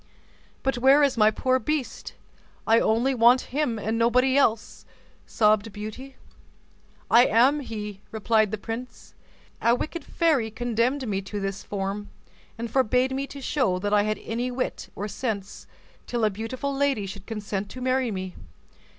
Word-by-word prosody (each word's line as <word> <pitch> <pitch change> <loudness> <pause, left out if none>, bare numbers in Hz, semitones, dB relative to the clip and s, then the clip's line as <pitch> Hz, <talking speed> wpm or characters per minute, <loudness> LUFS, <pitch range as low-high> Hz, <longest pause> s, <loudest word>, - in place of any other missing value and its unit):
"But 270 -2 0
where 270 +4 +6
is 280 - +2
my 215 -2 +5
poor 255 +4 +1
beast? 300 +1 -3 0.5
I 225 +1 +5
only 235 +5 +2
want 245 +1 +4
him 280 -6 0
and 220 +2 -2
nobody 250 +3 +3
else," 230 -6 +1 0.4
sobbed 215 0 +2
Beauty. 215 +6 -8 1.0
"I 240 +2 +7
am 260 +7 +4
he," 210 -6 -6
replied 220 -1 +2
the 215 - -3
prince. 230 +4 -7 0.5
"A 235 +1 +4
wicked 330 +6 -5
fairy 300 -10 +1
condemned 240 +4 -1
me 195 -2 -1
to 205 +1 -6
this 195 -1 -3
form, 200 +1 -4 0.5
and 230 -1 -5
forbade 255 0 +2
me 270 +1 -2
to 280 - -9
show 255 -9 0
that 205 +3 -2
I 205 - +5
had 215 +1 -1
any 240 +3 -2
wit 250 +1 -4
or 205 - -4
sense, 205 -2 -5 0.4
till 235 -2 0
a 215 - +2
beautiful 255 +7 -4
lady 275 -7 +1
should 195 0 -9
consent 205 -2 -4
to 255 - -9
marry 255 0 +1
me. 185 -3 -5
230 Hz, 160 wpm, -25 LUFS, 210-260 Hz, 1.0 s, I